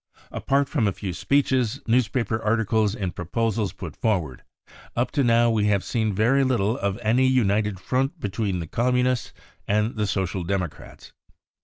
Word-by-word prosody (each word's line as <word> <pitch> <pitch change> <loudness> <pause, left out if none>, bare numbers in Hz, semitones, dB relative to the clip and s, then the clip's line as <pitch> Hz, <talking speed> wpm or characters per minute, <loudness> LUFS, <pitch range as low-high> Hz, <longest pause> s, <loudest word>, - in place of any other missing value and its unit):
Apart 140 0 0
from 110 - 0
a - - +2
few 95 -2 -5
speeches, 130 +2 +1
newspaper 115 -1 +1
articles 110 -1 +1
and 95 -5 -3
proposals 110 +3 -1
put 85 -5 -8
forward, 85 - -1 0.5
up 120 +2 0
to 140 - +1
now 120 -1 +4
we 110 -2 +1
have 100 -2 +2
seen 110 -3 -1
very 120 +8 +3
little 120 -4 +1
of 100 -2 -2
any 120 +4 +3
united 105 -5 +1
front 135 - -1
between 100 -4 -2
the 85 - -4
Communists 125 +5 0 0.4
and 105 +3 0
the 105 -1 0
Social 95 -1 -2
Democrats. 90 -2 -5
110 Hz, 155 wpm, -24 LUFS, 100-125 Hz, 0.5 s, now